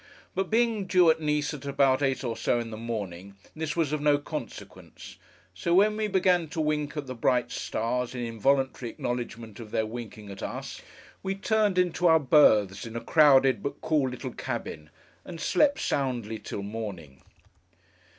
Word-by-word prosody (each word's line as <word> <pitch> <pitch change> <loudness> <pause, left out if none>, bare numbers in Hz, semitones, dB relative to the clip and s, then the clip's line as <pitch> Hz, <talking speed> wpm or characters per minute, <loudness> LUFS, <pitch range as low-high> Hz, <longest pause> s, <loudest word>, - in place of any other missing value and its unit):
But 190 -1 -2
being 225 -3 +1
due 180 -3 +5
at 160 - -1
Nice 150 0 0
at 145 -2 -8
about 140 -1 +2
eight 135 -1 0
or 115 -3 -2
so 115 +1 0
in 115 -1 -5
the - - -5
morning, 100 -5 -6 0.2
this 155 -1 -3
was 160 -4 0
of 155 - -1
no 145 -1 +4
consequence; 145 - -9 0.4
so 170 - 0
when 210 +3 +4
we 215 0 -1
began 180 -4 +2
to 160 - -6
wink 150 -1 -1
at 145 - -3
the 130 - -6
bright 125 0 +1
stars, 125 +2 -2
in 125 - -4
involuntary 125 +2 0
acknowledgment 120 -3 -5
of 115 -2 -9
their 110 - 0
winking 110 -2 -8
at 95 - -9
us, - - -6 0.4
we 195 0 -2
turned 210 -1 +1
into 180 -1 +2
our 160 -1 +6
berths, 110 -10 +4
in 115 - -9
a - - -1
crowded, 135 -6 +5
but 140 - -4
cool 150 -4 +1
little 125 - -6
cabin, 75 -1 -5 0.3
and 170 -2 -9
slept 285 - +2
soundly 120 -6 -2
till 100 - -6
morning. 100 -10 -7
135 Hz, 175 wpm, -27 LUFS, 115-160 Hz, 0.4 s, our